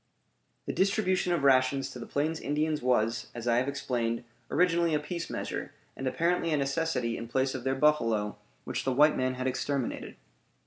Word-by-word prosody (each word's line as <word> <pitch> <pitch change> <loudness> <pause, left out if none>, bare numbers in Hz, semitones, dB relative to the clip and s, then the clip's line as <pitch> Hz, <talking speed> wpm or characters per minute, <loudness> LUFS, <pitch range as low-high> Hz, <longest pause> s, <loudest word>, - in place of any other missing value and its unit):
The - - -3
distribution 190 -2 +1
of 170 -5 +1
rations 135 0 +3
to 125 - -8
the 115 - -7
Plains 155 +3 -1
Indians 150 +1 -1
was, 115 -2 +1
as 120 0 -5
I 120 0 +3
have 125 +2 +1
explained, 120 -4 -1 0.3
originally 170 -2 +3
a - - +2
peace 170 +3 -5
measure, - - -4 0.2
and 135 - -4
apparently 170 +4 +1
a 150 - +2
necessity 135 -4 -1
in 115 - -6
place 130 +2 0
of 130 - -5
their 135 +1 0
buffalo 115 -8 +2 0.3
which - - -3
the 135 - 0
white 150 +4 +5
man 130 0 0
had 130 0 -4
exterminated. 130 0 -2
135 Hz, 180 wpm, -29 LUFS, 125-155 Hz, 0.3 s, white